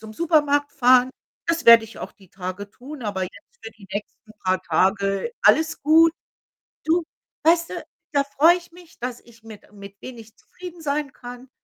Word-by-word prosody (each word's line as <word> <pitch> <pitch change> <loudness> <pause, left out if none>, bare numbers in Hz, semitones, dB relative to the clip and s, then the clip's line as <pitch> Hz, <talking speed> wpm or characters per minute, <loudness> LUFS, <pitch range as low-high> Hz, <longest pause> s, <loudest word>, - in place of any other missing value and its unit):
zum 220 0 -11
Supermarkt 295 -2 +1
fahren.“ 250 +1 +4 0.4
Das 335 -1 -1
werde 230 -1 +8
ich 225 - -13
auch - - -7
die 190 -4 -22
Tage 185 +2 -7
tun, 270 +4 -11
aber 195 -2 -3
jetzt 180 - -6 0.3
für 225 - -8
die 205 -2 -18
nächsten 210 +1 -8
paar 185 0 +1
Tage 195 - 0
alles 320 0 +3
gut. 320 +2 +5 0.7
Du? 330 +3 +2 0.4
Weißt 335 +1 +3
du? - - -5 0.4
Da 280 -1 +3
freue 300 +5 +4
ich 350 -1 -11
mich, 350 -2 -17
dass 245 0 -5
ich 230 -1 -21
mit 220 -2 -13
mit 200 0 -13
wenig 230 -3 -11
zufrieden 355 -2 -12
sein 285 -1 -2
kann. 245 +1 -11
250 Hz, 175 wpm, -22 LUFS, 210-315 Hz, 0.7 s, werde